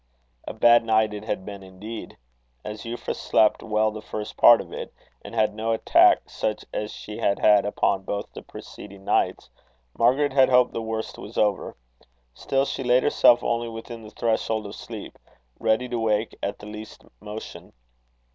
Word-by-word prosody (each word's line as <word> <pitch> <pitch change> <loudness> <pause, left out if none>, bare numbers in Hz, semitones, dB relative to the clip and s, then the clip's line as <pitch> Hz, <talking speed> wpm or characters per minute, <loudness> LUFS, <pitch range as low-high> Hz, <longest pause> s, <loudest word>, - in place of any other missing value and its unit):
A - - -4
bad 120 0 +5
night 110 -1 +2
it 105 0 -7
had 105 -4 -3
been 100 -1 -8
indeed. 100 +4 -9 0.5
As 105 0 -7
Euphra 120 +1 -4
slept 110 - +2
well 110 -1 +1
the 110 0 -8
first 105 -1 -6
part 120 -1 +7
of - - -8
it, - - -6 0.3
and - - -9
had 110 -2 +2
no 110 +1 -1
attack 110 - +4
such 110 - -3
as 105 0 -3
she 105 +1 -8
had 100 -3 +1
had 105 -1 +4
upon 100 -1 0
both 100 +1 -4
the - - -8
preceding 100 -1 -12
nights, - - 0 0.4
Margaret 130 +4 +2
had 135 -1 +5
hoped 125 -1 +4
the 115 - -3
worst 110 0 -5
was 110 - -10
over. 105 -2 0 0.6
Still 135 - 0
she 135 - -4
laid 125 +1 +3
herself 120 -4 +5
only 120 0 -1
within 115 +1 -8
the 110 - -11
threshold 110 -1 -1
of 100 - -7
sleep - - -9 0.4
ready 110 +3 +1
to 120 -1 -2
wake 110 0 0
at 100 - -3
the - - -12
least 105 +1 -10
motion. 105 +1 -9
110 Hz, 175 wpm, -24 LUFS, 105-115 Hz, 0.6 s, part